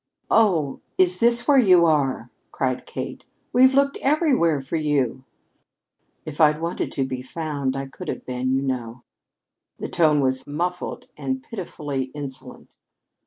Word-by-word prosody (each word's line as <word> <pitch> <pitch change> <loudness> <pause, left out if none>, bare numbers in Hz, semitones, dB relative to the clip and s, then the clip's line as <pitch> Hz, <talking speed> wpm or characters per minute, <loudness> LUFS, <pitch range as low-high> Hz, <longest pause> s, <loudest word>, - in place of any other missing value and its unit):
"Oh, 175 -11 +2 0.2
is 180 -1 +3
this 235 +1 +3
where 280 -2 +6
you 185 -7 +6
are?" 135 -6 +1 0.2
cried 130 -1 -2
Kate. - - -6 0.3
"We've 260 +2 +6
looked 280 0 +2
everywhere 270 - +2
for 135 +4 -5
you." 140 -5 0 1.0
"If 155 +1 -4
I'd 150 0 +5
wanted 170 +1 -3
to 135 - 0
be 130 -1 -4
found, 140 -1 -3
I 135 0 -3
could 135 - -10
have - - -5
been, 125 0 -2
you 135 +1 +1
know." 125 -2 -4 0.7
The - - -5
tone 155 -4 +3
was 130 -1 0
muffled 175 +5 -3
and 130 -2 -3
pitifully 145 - -4
insolent. 140 -3 -9
150 Hz, 145 wpm, -23 LUFS, 130-180 Hz, 1.0 s, where